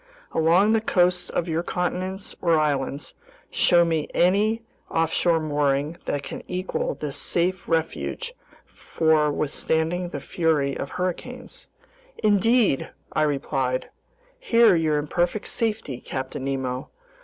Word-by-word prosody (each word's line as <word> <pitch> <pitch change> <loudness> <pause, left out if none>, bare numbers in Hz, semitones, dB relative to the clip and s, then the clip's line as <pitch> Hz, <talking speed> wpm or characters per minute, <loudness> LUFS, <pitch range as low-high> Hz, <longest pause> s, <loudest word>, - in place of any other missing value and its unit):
Along 170 +6 +4
the 225 - +3
coasts 180 -3 +2
of 175 - -1
your 165 0 0
continents 185 +2 -3
or 170 -2 +3
islands, 140 -1 -1 0.4
show 175 -2 +4
me 160 -3 0
any 210 +6 +3 0.3
offshore 165 +1 +2
mooring 145 0 0
that 145 - -2
can - - -6
equal 185 +1 -2
this 145 -2 -5
safe 180 +1 0
refuge 165 - -2 0.3
for 155 -2 +1
withstanding 160 +4 -1
the 145 - -5
fury 145 -2 0
of 140 - -4
hurricanes." 245 +8 -5 0.5
"Indeed," 215 - +3 0.2
I - - +1
replied, 135 -3 -1 0.5
"here 230 - +5
you're 155 -2 +2
in 145 - -1
perfect 175 +6 -1
safety, 215 - -2
Captain 130 0 -5
Nemo. 130 -1 -3
165 Hz, 120 wpm, -24 LUFS, 145-185 Hz, 0.5 s, here